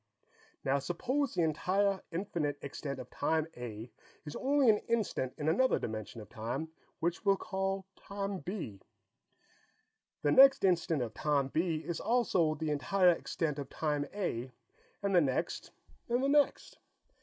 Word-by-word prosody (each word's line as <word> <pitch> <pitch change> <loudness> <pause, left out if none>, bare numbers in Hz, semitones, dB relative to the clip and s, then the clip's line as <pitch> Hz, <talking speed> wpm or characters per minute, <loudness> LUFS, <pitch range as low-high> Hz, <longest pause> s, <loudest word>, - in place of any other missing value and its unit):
Now, 135 +1 +2
suppose 250 - -1
the 170 - +2
entire, 190 +5 +1
infinite 165 -5 -2
extent 140 0 -5
of 125 -1 -9
Time 160 +2 +1
A 120 -1 -7 0.3
is 150 - -7
only 275 0 +2
an 210 -2 +6
instant 215 - -1
in 150 - -3
another 260 +12 +3
dimension 110 +1 -5
of 105 - -11
time, 125 +8 -4 0.3
which 170 +1 -1
we'll 195 -1 +4
call 195 -1 -2
Time 200 -1 -4
B. 170 - -6 1.4
The 145 - +3
next 270 - +8
instant 170 -6 +2
of 115 -2 -5
Time 140 -1 +1
B 160 +1 0
is 170 - -3
also 190 -10 +2
the 155 0 -2
entire 180 +6 +4
extent 160 -3 -2
of 140 - -6
Time 150 -2 -1
A, 130 - -3 0.5
and 200 -1 +1
the 175 - +6
next 135 -4 -1 0.4
and 245 +2 +1
the 275 - +2
next. 290 0 +2
165 Hz, 150 wpm, -32 LUFS, 140-200 Hz, 1.4 s, next